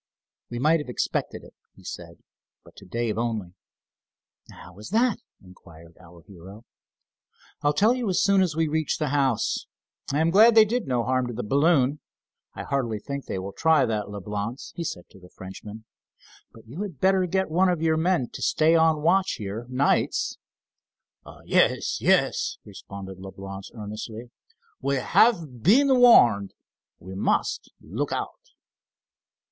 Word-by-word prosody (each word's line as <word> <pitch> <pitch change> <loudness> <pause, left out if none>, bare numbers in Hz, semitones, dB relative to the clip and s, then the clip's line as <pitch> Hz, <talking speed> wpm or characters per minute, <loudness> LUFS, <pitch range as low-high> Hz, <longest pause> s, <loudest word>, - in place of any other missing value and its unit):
"We 120 - -5
might 155 +6 +3
have 150 - -7
expected 125 - -3
it," - - -15 0.2
he - - -18
said, - - -9 0.4
but - - -19
to 100 - -13
Dave 115 +2 -2
only. 110 -7 -3 1.0
"How 90 +2 -14
is 105 - -9
that?" 230 +3 +1 0.2
inquired 85 -3 -16
our 85 -1 -16
hero. 95 +5 -14 1.0
"I'll 145 0 +2
tell 210 +10 +3
you 245 -6 -2
soon 195 +1 +3
as 175 -5 0
we 160 0 +1
reach 155 0 -1
the 150 -3 -2
house. 135 -5 0 0.4
I 145 - 0
am 165 +1 +2
glad 220 +5 +6
they 220 -1 +8
did 235 - -2
no 125 -2 0
harm 130 0 0
to 120 - -5
the 120 +2 -5
balloon. 140 +2 +2 0.6
I - - -6
hardly 125 -6 -2
think 140 +6 -6
they - - -4
will 95 +1 -6
try 160 -4 +3
that, 105 -3 -3
Leblance," 105 +4 -6
he 170 - -4
said 90 - -6
to - - -16
the 90 -1 -16
Frenchman, 105 +4 -10 0.7
"but 115 - -17
you 135 - -8
had 185 -10 -6
better 190 -1 +2
get 190 -1 -1
one 185 +3 +3
of 175 -3 -1
your 160 -1 +2
men 160 -5 0
to - - -10
stay 160 +1 +3
on 160 -2 +3
watch 190 +3 +2
here 105 +3 -6
nights." 130 +3 0 1.1
"Yes, - - +1
yes," - - +1
responded 95 -1 -10
Leblance 95 0 -9
earnestly. 110 +2 -8 0.5
"We 140 - 0
have 155 - +2
been 260 - +4
warned, 115 - +5 0.4
we 95 +2 -11
must 95 - -1
look - - -4
out." - - -3
130 Hz, 155 wpm, -25 LUFS, 105-165 Hz, 1.1 s, they